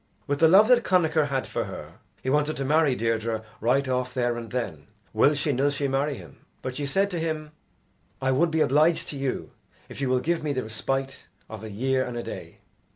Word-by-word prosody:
With 145 0 -1
the 165 - +7
love 195 +6 +7
that 245 -1 +5
Connachar 160 -4 +3
had 135 -2 -1
for - - -3
her, - - -9 0.2
he 130 - -1
wanted 150 +1 +1
to 135 - -2
marry 150 -1 +3
Deirdre 115 -1 -1 0.2
right 130 +5 +2
off 125 0 -1
there 120 -1 +1
and 115 -1 -6
then, 95 - -4 0.3
will 150 - +4
she 145 0 0
nill 135 +3 +2
she 140 0 -1
marry 135 +1 0
him. - - -13 0.3
But 130 -1 -4
she 145 -1 -2
said 195 +7 +1
to 175 - -2
him, 155 -2 -3 0.7
"I 130 0 +1
would 160 +6 +3
be 160 0 +1
obliged 155 +5 +3
to - - -5
you 135 -2 -3 0.4
if - - -8
you 135 - 0
will 130 0 +3
give 170 +5 0
me 150 -2 -1
the 130 -2 -2
respite 135 +5 -3 0.2
of 110 -1 -9
a 110 - -6
year 130 +5 0
and 125 -2 -5
a 120 - -3
day." - - -8
135 Hz, 220 wpm, -26 LUFS, 125-155 Hz, 0.7 s, the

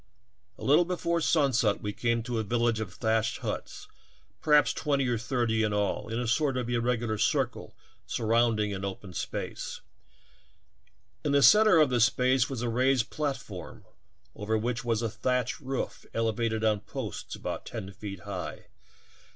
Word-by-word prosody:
A - - -11
little 150 +6 +5
before 170 -1 -1
sunset 130 -10 +2
we 105 0 -2
came 115 0 0
to 120 -1 -2
a - - 0
vil 115 +3 -1
lage 115 -2 +2
of 105 -5 -4
thatched 110 +2 0
huts, - - -5 0.5
perhaps 150 -1 +4
twenty 140 -3 0
or 120 -2 0
thirty 115 -2 0
in 105 -1 +1
all, 105 +1 -1
in 115 - -1
a 125 - -1
sort 135 +3 +1
of 125 -2 -2
irregular 120 -2 0
circle 125 +1 -1 0.3
surrounding 110 -2 +1
an 95 0 -5
open 95 -1 -6
space; - - -5 1.4
in 145 - 0
the 140 -1 +5
center 210 - +7
of 150 -4 +4
this 120 -2 +5
space 125 +2 +2
was 130 -3 -4
a - - 0
raised 125 0 +2
platform 135 -11 -5 0.5
over 110 +2 -1
which 120 +2 -2
was 115 -1 0
a 115 - 0
thatched 125 +1 -1
roof 135 -1 -4
elevated 115 0 0
on 110 -1 +2
posts - - -6
about - - -5
ten 95 - -6
feet 100 -2 -7
high. - - -6
120 Hz, 160 wpm, -29 LUFS, 110-130 Hz, 1.4 s, center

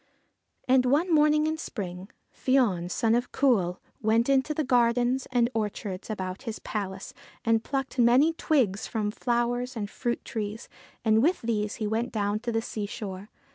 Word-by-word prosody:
And, 255 0 +5
one 320 +7 +2
morning 300 0 +4
in 315 0 -1
spring, 185 - -6 0.2
Fion, 220 -10 +1
son 225 +4 +1
of 245 +1 0
Cumhail, 195 -10 +2 0.2
went 225 +3 +2
into 275 +2 +3
the 305 +1 0
gardens 245 0 +2
and 240 -2 +3
orchards 205 -3 -3
about 185 -2 -4
his 225 -4 -5
palace 195 -2 -5 0.3
and 225 -1 +3
plucked 270 -1 -3
many 250 +7 +5
twigs 260 - +1
from 210 -2 -2
flowers 245 +2 -1
and 205 -3 -4
fruit 240 -1 -3
trees, 215 0 -4 0.4
and 220 0 +4
with 335 +3 +2
these 210 -2 -1
he 220 - -3
went 225 +3 -1
down 205 -1 -1
to 235 +1 -3
the 225 0 0
seashore. 205 -2 -5
230 Hz, 160 wpm, -27 LUFS, 210-255 Hz, 0.4 s, And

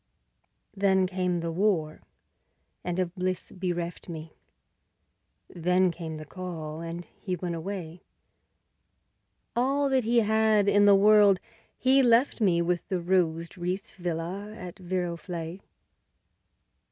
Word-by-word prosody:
Then 190 -1 +3
came 180 -2 -1
the 165 0 -2
War, 165 -4 0 0.8
and 175 0 -3
of 180 -2 -1
bliss 185 0 -3
bereft 175 -2 -4
me; 160 -1 -7 1.1
Then 180 +1 +2
came 165 -2 -6
the 155 - -8
call, 160 -2 -6
and 170 +1 -6 0.2
he 185 -3 -2
went 175 0 -4
away; 170 0 -6 1.5
All 275 +4 +2
that 260 -2 +2
he 235 +1 +3
had 220 -1 +3
in 205 0 +5
the 200 -1 +7
world 205 -1 +6 0.4
he 265 +1 +4
left 240 0 +3
me, 170 -5 +3
With 175 0 -1
the 185 - 0
rose 170 -2 0
wreathed 180 +3 -3
villa 175 +3 -4
at 180 -1 -8
Viroflay. 175 -1 -4
180 Hz, 120 wpm, -27 LUFS, 170-200 Hz, 1.5 s, the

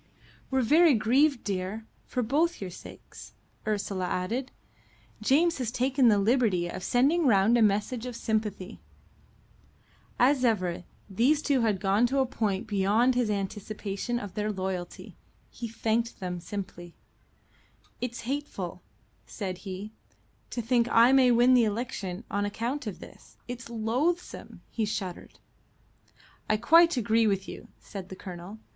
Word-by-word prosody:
"We're 265 -1 +1
very 310 +4 +5
grieved, 260 +5 +2
dear, 200 +2 -3 0.2
for 250 - -2
both 310 +9 +1
your 190 -2 -6
sakes," - - -12 0.3
Ursula 200 -3 -1
added. 225 +10 -2 0.7
"James 310 +8 +3
has 250 -4 -1
taken 255 +1 +2
the 210 -3 +5
liberty 205 -5 +2
of 175 - -6
sending 285 +6 +2
round 210 0 +4
a 240 - +3
message 220 +4 +1
of 245 - -6
sympathy." 215 -3 -3 1.4
As 260 +1 +3
ever, 185 -7 0 0.2
these 260 +10 +2
two 275 -4 +2
had 215 -4 +1
gone 205 +5 +2
a 270 -1 +2
point 215 -5 -2
beyond 210 +4 +2
his 245 -3 0
anticipation 205 +2 -3
of 205 -5 -6
their 210 0 -1
loyalty. 185 -3 -5 0.3
He 235 - -6
thanked 230 +1 -1
them 180 -1 -4
simply. 175 -2 -7 1.1
"It's 245 -1 -4
hateful," 280 +5 -4 0.5
said 185 -4 -5
he, 195 +1 -7 0.6
"to 240 - -4
think 235 0 +2
I 235 +2 +6
may 265 -2 +5
win 245 +1 +5
the 245 -2 +5
election 210 -3 -4
on 205 0 0
account 235 +6 -3
of 200 - -6
this. - - -14
It's 240 -1 -7
loathsome." 250 +10 -2
He 225 - -2
shuddered. 200 -4 -5 1.1
"I 215 - +3
quite 330 +7 +5
agree 225 -1 +2
with 195 -2 0
you," - - -9
said 190 -3 -9
the 190 - -7
Colonel. 185 +2 -9
225 Hz, 140 wpm, -28 LUFS, 195-250 Hz, 1.4 s, I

